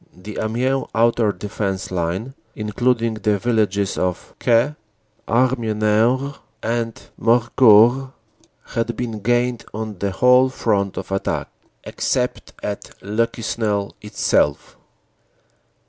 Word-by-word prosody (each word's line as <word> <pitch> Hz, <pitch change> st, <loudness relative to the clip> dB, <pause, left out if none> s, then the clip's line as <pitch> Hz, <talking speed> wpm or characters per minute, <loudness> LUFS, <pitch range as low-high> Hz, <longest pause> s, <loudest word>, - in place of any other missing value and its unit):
The 100 Hz, +4 st, -8 dB
Amiens 125 Hz, +5 st, 0 dB
outer 115 Hz, -1 st, +3 dB
defense 100 Hz, 0 st, -4 dB
line, 90 Hz, +8 st, -2 dB, 0.2 s
including 115 Hz, +2 st, 0 dB
the 105 Hz, -1 st, 0 dB
villages 100 Hz, -3 st, 0 dB
of 90 Hz, -1 st, -2 dB
Caix, 120 Hz, +5 st, +3 dB, 0.5 s
Harbonnieres 120 Hz, +2 st, +1 dB, 0.2 s
and 115 Hz, 0 st, -2 dB, 0.2 s
Morcourt, 120 Hz, +2 st, +5 dB, 0.6 s
had 115 Hz, 0 st, -2 dB
been 115 Hz, -3 st, -3 dB
gained 120 Hz, +2 st, +1 dB
on 110 Hz, -3 st, -5 dB
the 100 Hz, -, 0 dB
whole 125 Hz, +6 st, +5 dB
front 100 Hz, -6 st, -1 dB
of -, -, -6 dB
attack, 95 Hz, -, -2 dB, 0.3 s
except -, -, -2 dB
at 100 Hz, -1 st, -4 dB
Le 110 Hz, +3 st, +1 dB
Quesnel 110 Hz, -3 st, -2 dB
itself. 90 Hz, -8 st, 0 dB
110 Hz, 100 wpm, -21 LUFS, 105-120 Hz, 0.6 s, Morcourt